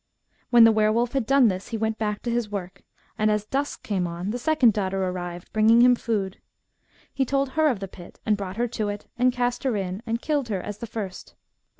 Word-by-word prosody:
When 240 Hz, -1 st, +7 dB
the 225 Hz, -, +8 dB
were 215 Hz, -1 st, +3 dB
wolf 235 Hz, +2 st, +1 dB
had 270 Hz, -5 st, -1 dB
done 275 Hz, -2 st, +5 dB
this 185 Hz, -2 st, -2 dB
he 230 Hz, -, -3 dB
went 220 Hz, 0 st, -2 dB
back 210 Hz, -1 st, -2 dB
to 240 Hz, -, -2 dB
his 235 Hz, -2 st, -1 dB
work, 185 Hz, -3 st, -6 dB, 0.4 s
and 215 Hz, 0 st, +3 dB
as 210 Hz, 0 st, 0 dB
dusk 275 Hz, +6 st, -3 dB
came 190 Hz, -4 st, -1 dB
on, 175 Hz, +4 st, -4 dB
the 245 Hz, -, -3 dB
second 255 Hz, -4 st, +3 dB
daughter 195 Hz, -2 st, -1 dB
arrived, 175 Hz, -1 st, -5 dB
bringing 220 Hz, +2 st, +5 dB
him 250 Hz, 0 st, +7 dB
food. 210 Hz, -6 st, -2 dB, 0.7 s
He 270 Hz, -, +1 dB
told 275 Hz, +1 st, 0 dB
her 315 Hz, +3 st, +2 dB
of 250 Hz, -9 st, +1 dB
the 195 Hz, -, -4 dB
pit, 175 Hz, -1 st, -13 dB
and 215 Hz, -, +3 dB
brought 195 Hz, -1 st, -6 dB
her 240 Hz, +1 st, +1 dB
to 215 Hz, -3 st, -2 dB
it, 205 Hz, 0 st, -5 dB
and 250 Hz, +1 st, +4 dB
cast 245 Hz, 0 st, -1 dB
her 255 Hz, -6 st, 0 dB
in, 190 Hz, +1 st, -3 dB
and 230 Hz, +1 st, -1 dB
killed 285 Hz, -3 st, -1 dB
her 200 Hz, -3 st, -1 dB
as 205 Hz, +2 st, -7 dB
the 235 Hz, -, -6 dB
first. 210 Hz, -4 st, -7 dB
220 Hz, 235 wpm, -25 LUFS, 195-245 Hz, 0.7 s, the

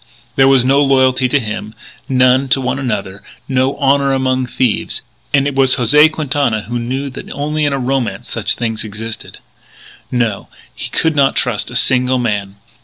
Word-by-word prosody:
There 135 Hz, 0 st, +5 dB
was 135 Hz, -2 st, +4 dB
no 135 Hz, +2 st, +4 dB
loyalty 130 Hz, -2 st, +3 dB
to 140 Hz, -, +2 dB
him, 110 Hz, -1 st, -6 dB, 0.3 s
none 130 Hz, +1 st, +3 dB
to 135 Hz, -, +4 dB
one 130 Hz, +1 st, -2 dB
another, 100 Hz, -6 st, -3 dB, 0.3 s
no 130 Hz, 0 st, 0 dB
"honour 140 Hz, -1 st, +2 dB
among 130 Hz, -1 st, 0 dB
thieves" 125 Hz, -3 st, -1 dB, 0.3 s
and 140 Hz, -1 st, +3 dB
it 145 Hz, -, -1 dB
was 135 Hz, -1 st, +4 dB
José 150 Hz, +5 st, +5 dB
Quintana 140 Hz, -8 st, -1 dB
who 120 Hz, +3 st, -4 dB
knew 130 Hz, +4 st, -3 dB
that 130 Hz, -, -9 dB
only 150 Hz, +1 st, -1 dB
in 145 Hz, -, 0 dB
romance 130 Hz, -2 st, -2 dB
such -, -, -1 dB
a -, -, -8 dB
thing 115 Hz, -2 st, -1 dB
existed. 110 Hz, +1 st, -7 dB, 0.7 s
No, 115 Hz, -5 st, -1 dB, 0.3 s
he -, -, -6 dB
could 160 Hz, -1 st, 0 dB
not 140 Hz, -2 st, +3 dB
trust 120 Hz, -4 st, 0 dB
a 125 Hz, -, -9 dB
single 125 Hz, +1 st, +2 dB
man. 105 Hz, -5 st, -2 dB
130 Hz, 175 wpm, -16 LUFS, 120-135 Hz, 0.7 s, There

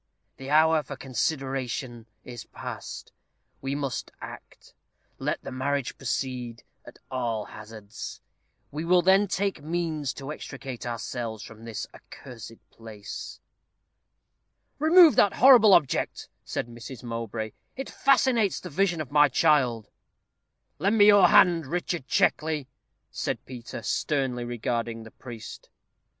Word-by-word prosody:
"The 135 Hz, 0 st, -8 dB
hour 160 Hz, +1 st, +5 dB
for 140 Hz, 0 st, -8 dB
consideration 130 Hz, -3 st, -3 dB, 0.2 s
is 120 Hz, -3 st, -9 dB
past. -, -, -8 dB, 0.5 s
We 135 Hz, +1 st, -2 dB
must 140 Hz, -3 st, -3 dB
act. -, -, -11 dB, 0.5 s
Let -, -, -2 dB
the -, -, -7 dB
marriage 135 Hz, +1 st, -2 dB
proceed, 125 Hz, -2 st, -4 dB, 0.2 s
at -, -, -13 dB
all 115 Hz, -4 st, -2 dB
hazards; 110 Hz, 0 st, -9 dB, 0.5 s
we 150 Hz, +3 st, -4 dB
will 175 Hz, +1 st, +4 dB
then 195 Hz, +3 st, +5 dB
take 195 Hz, -3 st, -1 dB
means 155 Hz, -3 st, -2 dB
to 140 Hz, +1 st, -7 dB
extricate 135 Hz, -5 st, -7 dB
ourselves 115 Hz, -2 st, -4 dB
from 115 Hz, 0 st, -12 dB
this 115 Hz, -2 st, -5 dB
accursed 115 Hz, -3 st, -12 dB
place." 110 Hz, -3 st, -9 dB, 1.4 s
"Remove 320 Hz, -2 st, +7 dB
that 200 Hz, -, +5 dB
horrible 235 Hz, -6 st, +8 dB
object," 150 Hz, -7 st, 0 dB
said -, -, -3 dB
Mrs. 120 Hz, +1 st, -10 dB
Mowbray; 115 Hz, -2 st, -4 dB, 0.2 s
"it 270 Hz, -, -5 dB
fascinates 255 Hz, -6 st, +2 dB
the -, -, -9 dB
vision 180 Hz, 0 st, +1 dB
of 140 Hz, -, -7 dB
my 150 Hz, 0 st, +5 dB
child." 125 Hz, -5 st, +2 dB, 0.9 s
"Lend 200 Hz, +7 st, +2 dB
me 205 Hz, -, +7 dB
your 205 Hz, -3 st, +8 dB
hand, 170 Hz, -4 st, +5 dB
Richard 175 Hz, -2 st, -3 dB
Checkley," 155 Hz, -3 st, +1 dB, 0.5 s
said -, -, -3 dB
Peter, 125 Hz, -2 st, -8 dB
sternly 130 Hz, -5 st, -1 dB
regarding 115 Hz, -1 st, -3 dB
the 110 Hz, -, -12 dB
priest. 115 Hz, -4 st, -10 dB
135 Hz, 125 wpm, -27 LUFS, 120-165 Hz, 1.4 s, horrible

